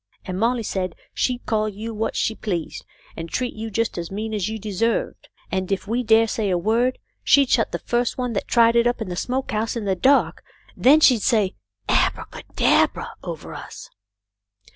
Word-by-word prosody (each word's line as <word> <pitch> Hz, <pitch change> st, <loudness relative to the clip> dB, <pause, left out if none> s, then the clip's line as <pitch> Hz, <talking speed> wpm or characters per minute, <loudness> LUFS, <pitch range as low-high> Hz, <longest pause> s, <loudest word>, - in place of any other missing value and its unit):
And 185 Hz, 0 st, -4 dB
Molly 235 Hz, +1 st, +1 dB
said 185 Hz, -4 st, -3 dB, 0.2 s
she'd 250 Hz, -1 st, -1 dB
call 215 Hz, -1 st, 0 dB
you 215 Hz, +3 st, -6 dB
what 220 Hz, +1 st, -2 dB
she 220 Hz, -, 0 dB
pleased, 180 Hz, -7 st, -4 dB, 0.3 s
and 165 Hz, 0 st, -6 dB
treat 250 Hz, +5 st, -2 dB
you 225 Hz, +1 st, -6 dB
just 225 Hz, -2 st, -1 dB
as 170 Hz, -, -5 dB
mean 215 Hz, +3 st, -4 dB
as 210 Hz, -1 st, -1 dB
you 220 Hz, -, -4 dB
deserved, 215 Hz, +2 st, -2 dB, 0.2 s
and 190 Hz, 0 st, -2 dB
if 195 Hz, 0 st, -2 dB
we 235 Hz, +4 st, 0 dB
dared 225 Hz, -1 st, +4 dB
say 215 Hz, -3 st, -1 dB
a 180 Hz, -, +2 dB
word 230 Hz, +7 st, +1 dB, 0.3 s
she'd 280 Hz, -3 st, +4 dB
shut -, -, +2 dB
the -, -, -2 dB
first 240 Hz, 0 st, -1 dB
one 250 Hz, -2 st, -2 dB
that 200 Hz, -, -3 dB
tried 230 Hz, 0 st, +4 dB
it 235 Hz, 0 st, +4 dB
up 240 Hz, -, 0 dB
in 220 Hz, -4 st, -4 dB
the 180 Hz, -, -4 dB
smoke 255 Hz, +7 st, -2 dB
house 220 Hz, +2 st, -1 dB
in 230 Hz, -3 st, -3 dB
the 190 Hz, -1 st, +1 dB
dark; 270 Hz, +9 st, +2 dB, 0.3 s
then 295 Hz, +5 st, +5 dB
she'd 250 Hz, -7 st, +5 dB
say 205 Hz, -3 st, +2 dB, 0.3 s
abra -, -, +1 dB
ca -, -, -9 dB
dab -, -, +3 dB
ra -, -, -5 dB
over -, -, -7 dB
us." -, -, -10 dB
220 Hz, 205 wpm, -22 LUFS, 195-240 Hz, 0.3 s, then